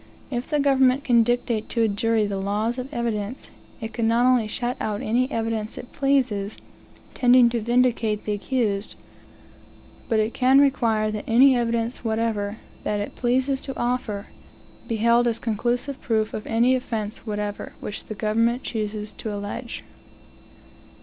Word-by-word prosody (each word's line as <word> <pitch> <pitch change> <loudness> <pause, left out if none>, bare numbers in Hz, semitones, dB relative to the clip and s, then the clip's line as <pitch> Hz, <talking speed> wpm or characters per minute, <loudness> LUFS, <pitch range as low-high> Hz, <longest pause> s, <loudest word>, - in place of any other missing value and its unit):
If 245 0 -3
the 300 - +1
government 270 -1 +3
can 240 -3 +5
dictate 235 -2 0
to 230 - +1
a - - +4
jury 220 +1 +1
the 200 -1 -3
laws 210 +5 -1
of 255 +3 -6
evidence, 235 -2 -3 0.3
it 225 0 -6
can 230 -1 0
not 235 +2 +3
only 250 -4 +4
shut 240 +3 -2
out 215 +2 -2
any 250 +3 +1
evidence 225 -3 -2
it 245 - -9
pleases, 255 -7 0 0.6
tending 245 -1 +5
to 235 -1 -1
vindicate 235 -2 +1
the 210 - -1
accused, 205 -1 -1 1.1
but 225 - +2
it 215 +1 0
can 260 +1 +5
require 230 -6 +2
that 215 -1 -4
any 255 +3 +6
evidence 235 0 -1
whatever, 220 -2 -1 0.3
that 210 - -1
it 205 - -5
pleases 260 +2 +1
to 270 - -7
offer, 240 -4 -2 0.6
be 230 - -1
held 235 +2 +3
as 230 -1 0
conclusive 240 +4 -2
proof 220 -2 0
of 215 - -5
any 235 +3 +3
offence 225 -4 -3
whatever 205 -1 -4
which 205 - -6
the 215 - -6
government 230 +4 +1
chooses 210 -1 -4
to 220 - -5
allege. 205 +4 -5
230 Hz, 155 wpm, -24 LUFS, 215-250 Hz, 1.1 s, any